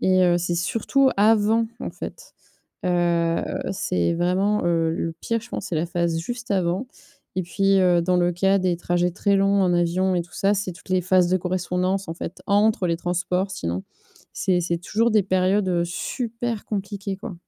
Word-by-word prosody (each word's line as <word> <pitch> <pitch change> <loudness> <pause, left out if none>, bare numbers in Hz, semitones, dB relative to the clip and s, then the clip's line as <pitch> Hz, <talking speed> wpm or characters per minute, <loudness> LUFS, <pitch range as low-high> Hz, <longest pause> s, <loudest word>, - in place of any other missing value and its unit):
et 185 0 +3
heu, 175 0 +3
c'est 175 0 -1
surtout 230 +9 +2
avant, 220 +2 +4
en - - -4
fait. - - -9 0.5
Heu, 170 -2 +1 0.3
c'est 90 - 0
vraiment, 185 +4 +1
heu, 165 -1 +2
le 165 0 -3
pire, 230 0 -1
je 235 - -12
pense, - - -5
c'est 170 - -3
la 160 +2 0
phase 170 -1 -1
juste 235 +4 -5
avant. 185 +5 0 0.5
Et - - +2
puis, 195 +2 +2
heu, 175 -2 +4
dans 180 +1 +1
le 175 0 +2
cas 195 +3 +2
des 185 -2 +1
trajets 175 0 0
très 200 +2 +1
longs 195 0 +3
en 180 -2 +2
avion 175 +2 +1
et 175 - +1
tout 175 - -14
ça, 200 +1 +2
c'est 190 -3 -2
toutes 170 - -17
les 185 0 +3
phases 185 0 +3
de 185 - +3
correspondance, 185 +1 -1
en - - -3
fait, 170 - -7
entre 205 -1 +3
les 170 - 0
transports, 180 +2 -1
sinon. 90 - -3 0.5
C'est 185 -2 +1
c'est 170 0 -1
toujours 225 +7 0
des 215 -3 +4
périodes, 190 +1 +1
heu, 175 -1 +1
super 230 +4 -4
compliquées, 200 -1 -4
quoi. 205 0 -7
185 Hz, 190 wpm, -23 LUFS, 175-200 Hz, 0.5 s, avant